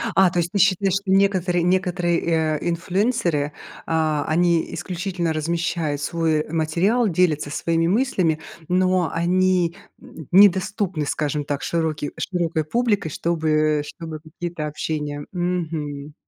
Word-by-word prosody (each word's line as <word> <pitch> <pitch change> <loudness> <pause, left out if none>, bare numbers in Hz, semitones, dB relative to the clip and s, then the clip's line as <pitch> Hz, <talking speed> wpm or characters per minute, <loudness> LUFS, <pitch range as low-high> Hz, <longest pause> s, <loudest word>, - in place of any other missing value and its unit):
А, 190 +1 +6
то 175 - -1
есть 170 0 -1
ты 205 - -1
считаешь, 195 0 +3
что 195 0 -1
некоторые 190 -3 +2
некоторые, 180 -1 +1
э, 160 -2 +1
инфлюенсеры, 175 - 0 0.3
а, 155 -2 0
они 170 +1 +1
исключительно 175 0 -3
размещают 165 -2 -1
свой 160 -1 0
материал, 170 +9 +1
делятся 160 -5 +1
своими 165 +2 0
мыслями, 185 -7 +1 0.3
но 185 -1 +2
они, 180 0 +2 0.3
м, 160 -4 -12
недоступны, 190 -3 +4
скажем 145 0 -2
так, 145 0 -3
широки 160 -3 -1
широкой 170 -3 -1
публикой, 205 -2 0
чтобы 160 0 -1 0.4
чтобы 160 0 -8
какие-то 160 0 -6
общения. 150 -1 -4
Мгм. 160 -5 -3
170 Hz, 120 wpm, -22 LUFS, 155-185 Hz, 0.4 s, А